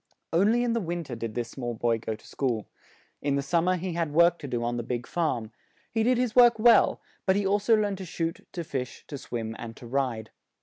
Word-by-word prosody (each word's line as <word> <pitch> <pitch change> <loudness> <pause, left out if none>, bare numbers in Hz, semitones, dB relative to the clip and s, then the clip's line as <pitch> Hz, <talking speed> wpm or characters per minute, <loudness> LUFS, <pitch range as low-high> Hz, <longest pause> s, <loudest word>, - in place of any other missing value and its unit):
On 195 +6 +4
ly 235 - +3
in 240 -1 +1
the 230 - 0
win 170 -1 -3
ter 135 - -8
did 115 -2 -5
this 120 -1 -3
small 120 -3 -4
boy 115 0 +1
go 110 0 -3
to - - -17
school; 120 -6 -1 0.6
in 140 -1 +1
the 140 - 0
sum 165 +4 +1
mer 185 0 +3
he 180 0 -3
had 165 -3 -1
work 170 +2 +4
to 145 - -6
do 120 -3 -2
on 120 0 -1
the - - -1
big 120 0 -3
farm; 125 -10 -1 0.4
he 225 - 0
did 245 +2 +3
his 245 -2 0
work 240 -2 +7
well; 235 +2 +5 0.3
but 190 - +4
he 200 0 +1
also 205 +3 +3
learned 205 -2 -1
to 190 - -5
shoot, 165 -1 -3
to 170 - -3
fish, 130 -6 -5
to 145 - -5
swim, 115 -3 -5
and 115 -1 -7
to - - -11
ride. 120 -3 -2
155 Hz, 250 wpm, -27 LUFS, 120-195 Hz, 0.6 s, work